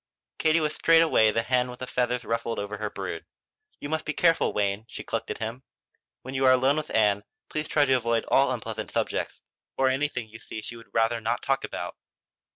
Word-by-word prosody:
Katie 160 +1 +4
was 155 -1 0
straightway 165 -9 +5
the 115 +2 0
hen 125 0 +1
with 125 +1 -7
feathers 125 -1 -1
ruffled 115 0 -2
over 105 0 -4
her 105 -1 -2
brood. - - -5 0.6
"You - - -5
must 160 +1 -1
be 155 - -3
careful, 165 0 +3
Wayne," 100 +1 -1
she - - -7
clucked - - -3
at - - -3
him. 115 +3 -5 0.6
"When 130 - -7
you 135 0 0
are - - +8
alone 130 +3 +3
with 155 0 -3
Ann 105 -2 +2 0.3
please 155 0 -3
try 145 -1 +3
to 135 - +3
avoid 115 -2 +1
all 135 0 +4
unpleasant 110 -3 -4
subjects, - - -2 0.4
or 135 0 +4
anything 130 -3 -1
you 110 +1 -12
see 110 -1 -8
she 120 - -7
would 115 0 -13
rather 115 +1 +1
not 115 +2 -1
talk 135 0 +1
about." - - -5
125 Hz, 205 wpm, -27 LUFS, 110-140 Hz, 0.6 s, are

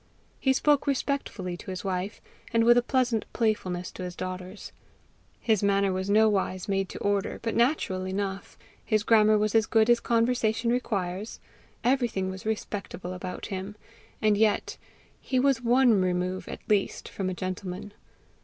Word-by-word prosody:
He 265 - +2
spoke 290 +2 +2
respectfully 265 -10 -2
to - - -10
his 185 -1 -5
wife, 190 +1 -3 0.3
and 230 0 +3
with 240 +1 +6
a 245 - +5
pleasant 245 -3 +1
playfulness 185 -6 -1
to - - -9
his 180 -1 -5
daughters; 185 +2 -6 0.7
his 220 -4 +1
manner 200 -1 +2
was 190 +1 -3
nowise 205 -3 +2
made 195 -2 0
to - - -7
order, 200 -1 -1
but 230 - -2
natural 235 -7 +1
enough; 195 0 -4 0.3
his 215 -2 +1
grammar 215 -1 +5
was 210 0 0
as 225 -1 +3
good 220 +1 +4
as 240 - +4
conversation 230 -1 +1
requires; 200 -4 -2 0.4
everything 235 -7 +1
was 190 +3 -8
respectable 200 -4 -4
about 185 0 -6
him 190 +2 -5 0.5
and 210 -1 +4
yet 215 0 +1 0.4
he 260 - -1
was 265 -2 +2
one 240 -3 +4
remove 185 0 -1
at - - -9
least 205 -2 0
from 190 -2 -3
a 185 - -3
gentleman. 185 +2 -5
205 Hz, 155 wpm, -27 LUFS, 185-230 Hz, 0.7 s, with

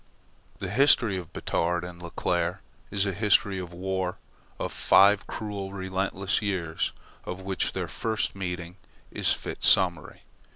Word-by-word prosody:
The 95 -1 -5
history 120 -4 +4
of 90 -2 -7
Batard 85 -1 -1
and 90 0 -8
Leclere 85 +1 -1 0.3
is 100 0 +1
a 100 - -1
history 100 -1 +2
of 90 -2 -6
war 95 0 -3 0.4
of - - -3
five 100 0 +5
cruel, 100 -2 -5
relentless 95 +1 -1
years, 90 -6 -1 0.3
of 90 +1 -6
which 95 0 -1
their - - -3
first 110 -3 -2
meeting 90 -1 -5 0.3
is - - +2
fit - - -3
summary. 90 -4 +4
95 Hz, 135 wpm, -27 LUFS, 90-100 Hz, 0.4 s, five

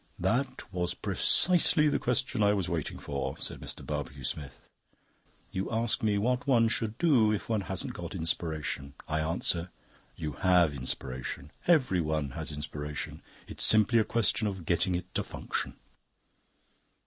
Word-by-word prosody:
"That 120 +9 0
was 90 -1 -1
precisely 170 -4 +4
the 145 - +1
question 125 -1 +1
I 105 0 +5
was 95 -4 0
waiting 80 -3 -3
for," 70 -2 -4
said - - -3
Mr. - - -6
Barbecue 70 -2 -4
Smith. 70 -1 -4 0.9
"You 95 +1 -2
ask 115 0 +1
me 105 -2 +2
what 125 +6 0
one 115 -4 +4
should 110 -1 -1
do 130 -11 +4
if 105 - -2
one 110 -3 +1
hasn't 95 - -2
got - - -6
Inspiration. 80 -4 -3
I 75 +1 0
answer: 85 +2 0 0.5
you 75 -1 -4
have 90 +1 +3
Inspiration; 65 +1 -4 0.2
everyone 85 - +2
has 65 - -4
Inspiration. 75 0 -5 0.3
It's - - -3
simply 110 +2 +4
a - - +4
question 115 -1 +2
of 95 -4 -5
getting 90 +2 +1
it 90 +1 -5
to - - 0
function." - - -4
90 Hz, 150 wpm, -30 LUFS, 75-115 Hz, 0.9 s, I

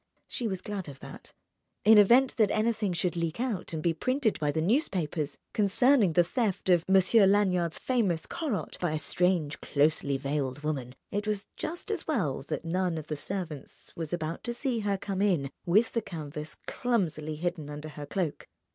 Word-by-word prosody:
She 240 - -3
was 190 -3 -3
glad 195 -6 -5
of 135 -1 -11
that. - - -11 0.5
In 215 0 +9
event 245 +6 +5
that 215 -4 +4
anything 215 -2 +1
should 175 +1 0
leak 170 +2 -2
out 235 -8 -2
and 160 -2 -4
be 170 - +2
printed 255 - 0
by 150 -2 +1
the 160 - -1
newspapers 170 - 0 0.2
concerning 210 - +4
the 175 - +5
theft 195 -1 0
of 175 -2 +4
Monsieur 195 +2 +6
Lanyard's 185 -4 +2
famous 205 -11 0
"Corot" 235 - -3
by 175 -3 0
a - - 0
strange, 160 0 0
closely 145 -1 +1
veiled 140 0 -2
woman, 135 -5 -3 0.2
it 205 +1 -2
was 210 -2 -1
just 345 +6 -5
as 405 -6 -3
well 175 - 0
that - - -3
none 180 0 0
of 155 -1 -7
the 155 - -1
servants 160 -3 -6
was 165 -2 -4
about 165 -1 -3
to 240 0 -2
see 250 -2 -1
her 205 -2 0
come 195 0 -3
in 170 -10 +1 0.2
with 210 +7 +4
the 230 - 0
canvas 155 -4 -7
clumsily 165 -11 -1
hidden 165 -2 -3
under 150 +1 -6
her 145 -1 -8
cloak. 175 -3 -3
180 Hz, 180 wpm, -29 LUFS, 155-210 Hz, 0.5 s, In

